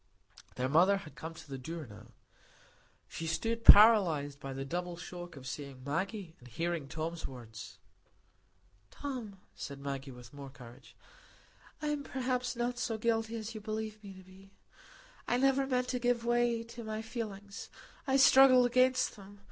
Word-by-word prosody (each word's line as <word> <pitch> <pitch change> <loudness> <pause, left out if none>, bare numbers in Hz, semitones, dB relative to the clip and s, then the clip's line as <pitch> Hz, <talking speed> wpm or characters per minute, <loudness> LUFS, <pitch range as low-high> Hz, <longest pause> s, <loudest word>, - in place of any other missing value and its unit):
Their 125 +1 -1
mother 175 +8 +5
had 170 -6 -10
come 165 +1 -8
to 160 - -12
the 135 -2 -6
door 160 +4 -6
now. 110 0 -13 1.0
She 165 - -6
stood 230 +7 -1
paralyzed 175 -12 +7
by 135 -1 -6
the 135 0 -5
double 175 +4 -4
shock 175 0 -8
of 135 -2 -11
seeing 135 -1 -7
Maggie 185 - -3
and 125 - -15
hearing 165 +4 -3
Tom's 160 +3 -4
words. 115 -4 -10 1.1
"Tom," 240 - -6
said 140 - -7
Maggie, 140 0 -5
with 125 -1 -12
more 140 -1 -9
courage, 120 -3 -14 0.9
"I 300 - 0
am 295 -1 -2
perhaps 250 -2 -2
not 240 +1 -2
so 225 -2 -1
guilty 225 0 0
as 225 0 -5
you 215 - -7
believe 215 0 -5
me 195 -2 -10
to 190 - -13
be. 190 +1 -18 0.7
I 245 - +2
never 270 +1 +3
meant 250 -1 0
to 250 - -1
give 245 -1 +1
way 240 -1 +2
to 235 +1 -9
my 220 0 -4
feelings. 205 -4 -6 0.4
I 270 0 +3
struggled 265 -2 +7
against 255 +1 +3
them. 200 0 -13
200 Hz, 165 wpm, -32 LUFS, 145-235 Hz, 1.1 s, paralyzed